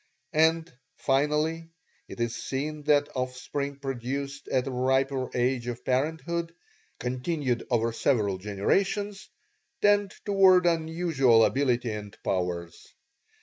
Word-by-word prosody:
And, 160 -1 +2 0.2
finally, 150 +4 0 0.4
it - - -10
is 120 0 -1
seen 150 +3 -4
that 145 -1 +3
offspring 130 +2 -3
produced 135 +1 -4
at 130 -1 0
a 135 - -3
riper 130 +1 +1
age 125 0 0
of 120 0 -5
parenthood, 160 +5 -1 0.4
continued 125 0 -2
over 115 -1 +1
several 105 -7 +1
generations, 195 - -1 0.5
tend 205 -1 +3
toward 190 -3 +5
unusual 160 -8 +3
ability 125 -4 +1
and 105 -1 -7
powers. 90 -2 -3
135 Hz, 105 wpm, -27 LUFS, 125-160 Hz, 0.5 s, toward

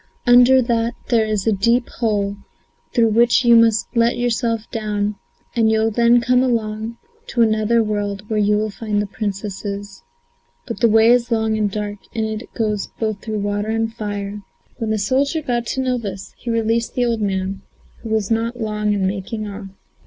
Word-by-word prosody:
Under 250 +1 +6
that 235 0 0
there 225 -3 +3
is 210 -3 -1
a 225 - +3
deep 235 +5 +2
hole 205 -3 -1 0.6
through 230 -3 +3
which 235 +3 +3
you 235 0 +7
must 225 -1 +4
let 235 +1 +3
yourself 235 -1 0
down, 210 -2 -1 0.4
and 225 -2 +3
you'll 220 0 +2
then 235 +2 +4
come 250 +1 +3 0.9
to 240 - 0
another 220 +1 +2
world 205 -1 -3
where 215 -1 0
you 210 0 +3
will 215 0 -1
find 210 -1 -2
the 205 - 0
Princesses. 200 -1 -5 0.6
But 230 -5 -6
the 235 0 +4
way 225 +1 +5
is 245 0 +3
long 220 -2 +1
and 210 -1 +1
dark 205 0 -4 0.2
and 220 -1 0
it 220 +2 -5
goes 210 -3 -1
both 215 -3 -2
through 215 -2 -3
fire 205 +1 -1
and 225 0 -1
water." 205 -1 -4 0.4
When 225 - -2
the 220 - +1
soldier 270 +9 +1
got 240 -3 -1
to 265 - -1
know 255 -1 0
this, 195 -3 -7
he 240 - -8
released 230 0 0
the 245 - +2
old 230 -2 0
man, 190 -1 -2 0.4
who 225 - -7
was 220 -1 0
not 230 +2 -1
long 210 -1 -1
in 200 -2 0
making 205 +3 -3
off. 200 0 -7
220 Hz, 180 wpm, -20 LUFS, 205-235 Hz, 0.9 s, you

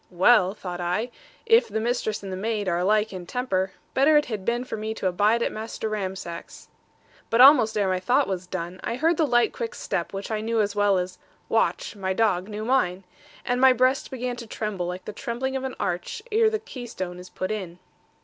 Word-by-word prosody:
'Well,' 190 +1 +4
thought 180 -3 -6
I, 180 +8 -1 0.3
'if 460 +1 +5
the 220 +1 -2
mistress 220 -2 -1
and 195 - -6
the - - -3
maid 210 +1 -2
are 175 -1 +1
alike 210 +3 +2
in 180 -2 -7
temper, 190 -6 -1 0.2
better 295 +3 +5
it 295 - +3
had 215 -5 -4
been 240 +4 0
for 255 - -5
me 220 0 -4
to - - -6
abide 210 +6 +2
at - - 0
Master 220 0 -5
Ramsack's.' 190 -5 -6 0.6
But 230 - +1
almost 250 -5 +7
ere 200 -2 +2
my 185 0 +1
thought 250 +9 +2
was 185 -2 -3
done, 180 0 -5
I 230 - -2
heard 320 +5 +2
the 315 - +2
light 240 -2 +3
quick 475 0 -4
step - - -3
which 195 +2 -5
I 215 -1 -1
knew 225 +1 0
as 205 -1 0
well 205 -1 +3
as 180 0 -3 0.3
'Watch,' - - 0
my 190 -2 -2
dog, 190 -3 +1
knew 215 +1 -5
mine; 195 -8 +1 0.4
and 245 +1 0
my 265 -1 +7
breast 255 +2 +2
began 250 -1 -4
to 235 -2 -8
tremble, 210 -5 -3
like 180 +1 -6
the 215 - -6
trembling 250 +5 -3
of 265 - -2
an 265 -1 -4
arch 175 0 -3
ere 440 +1 +4
the 435 - -1
keystone 190 - -7
is 180 0 -11
put 185 - -4
in. 185 -5 -5
215 Hz, 215 wpm, -25 LUFS, 185-245 Hz, 0.6 s, almost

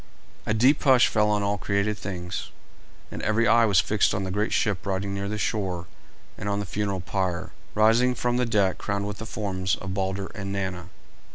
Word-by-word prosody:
A 110 - +2
deep 130 +7 +4
hush 130 -4 +6
fell 105 -1 +2
on 105 -1 +1
all 100 0 0
created 100 +2 0
things, 90 -2 -5 0.6
and - - -6
every 115 +2 +2
eye 115 0 +5
was 100 -4 +4
fixed 105 +3 +2
on 95 - -1
the 95 - -3
great 105 +3 0
ship 100 -5 0
riding 100 0 -2
near 100 0 -3
the 105 - -3
shore, 95 -5 -2 0.5
and 105 - -3
on 100 0 0
the 100 - -3
funeral 100 0 -2
pyre 90 -1 -2 0.2
rising 115 +4 +4
from 120 0 0
the 125 -1 +1
deck 100 -4 +1
crowned 100 0 -2
with 105 -1 -5
the 110 - -6
forms 95 -4 -1
of 95 -1 -6
Balder 95 0 -2
and 100 -3 -5
Nanna. 95 -3 -3
100 Hz, 200 wpm, -26 LUFS, 95-110 Hz, 0.6 s, hush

